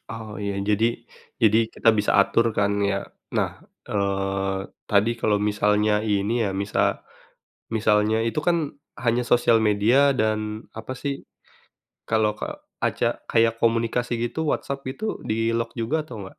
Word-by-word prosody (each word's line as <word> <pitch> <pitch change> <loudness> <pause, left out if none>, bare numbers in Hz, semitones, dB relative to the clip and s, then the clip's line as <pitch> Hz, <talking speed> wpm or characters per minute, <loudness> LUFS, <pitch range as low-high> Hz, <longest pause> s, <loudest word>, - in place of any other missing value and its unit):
Oh, 110 -2 -7
iya. 100 -1 -3
Jadi 110 +4 +1 0.4
jadi 110 +1 +5
kita 115 - +3
bisa 105 -1 +2
atur 115 +3 +3
kan 100 0 +1
ya. 100 -1 0 0.3
Nah, - - +1 0.4
eee, 95 -1 -1 0.3
tadi 105 +3 +4
kalau 105 -3 +2
misalnya 105 0 +2
ini 105 +2 +1
ya, - - -1
misa 100 +1 0 0.7
misalnya 110 0 +2
itu 115 +6 -1
kan, 165 -2 0 0.3
hanya 120 0 +1
sosial 120 -1 +4
media 115 +7 +4
dan 110 -1 -1
apa 110 +3 -6
sih, 140 +1 -4 0.8
kalau 110 -1 +2
ka - - -6 0.2
aca - - 0
kayak 115 0 +3
komunikasi 115 +1 +1
gitu, 160 - -5
WhatsApp 140 0 -4
itu, 215 +12 -4
di-lock 115 +1 -1
juga 125 +7 -1
atau 115 -9 -8
nggak? 95 - -13
110 Hz, 140 wpm, -24 LUFS, 105-115 Hz, 0.8 s, jadi